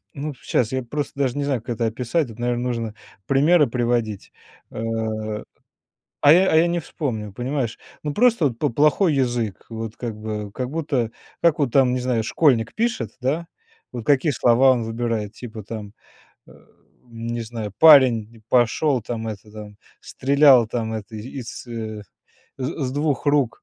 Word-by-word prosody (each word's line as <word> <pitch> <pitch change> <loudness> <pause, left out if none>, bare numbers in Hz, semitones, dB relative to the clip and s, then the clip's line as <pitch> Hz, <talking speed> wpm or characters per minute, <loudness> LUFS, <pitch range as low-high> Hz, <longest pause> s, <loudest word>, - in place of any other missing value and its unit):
Ну, 145 0 -5
щас 125 -2 -1
я 130 0 -1
просто 140 +3 -5
даже 135 0 0
не 145 - -1
знаю, 135 -4 0
как 120 -1 -4
это 115 - 0
описать. 125 +5 -1
Это, 115 +1 -11
наверно, 120 0 -1
нужно 115 -3 -3 0.3
примеры 150 +3 +4
приводить, 120 -4 -1 0.4
э, - - -12 1.5
а 145 - +8
я 185 +3 +4
а - - +3
я 165 +2 +5
не 175 0 0
вспомню, 120 - -4
понимаешь? 125 +1 -3 0.3
Ну, 150 - -2
просто 235 -5 +3
вот 120 -4 -6
по - - +1
плохой 150 - +3
язык, 120 -6 -1
вот 115 -1 -6
как 115 -3 -5
бы, 105 -1 -5
как 125 -1 -3
будто, 140 -7 -1 0.3
как 170 -3 +3
вон 140 -4 +2
там, 125 0 +3
не 125 - 0
знаю, 125 -3 0
школьник 120 -2 +2
пишет, 220 - -1
да, 150 +7 -1 0.4
вот 120 -3 -6
какие 145 +2 +3
слова 125 +2 +4
он 120 -3 +1
выбирает, 115 -2 -3
типа 115 -3 -8
там, 105 -1 -7 0.5
э, - - -16 0.6
не 115 0 -4
знаю, 110 -2 -6
парень 125 -8 +6
н 110 - -19
пошел, 125 +3 +2
там, 115 +1 -5
это, 105 -1 -7
там, 105 -1 -10 0.2
стрелял 135 -3 +4
там, 110 -1 -3
это, 110 0 -6
из, 120 +3 -7
э, 110 -2 -5 0.6
з 135 +3 -3
с 130 - -4
2 145 -1 -1
рук. 140 -6 +1
120 Hz, 170 wpm, -22 LUFS, 115-145 Hz, 1.5 s, а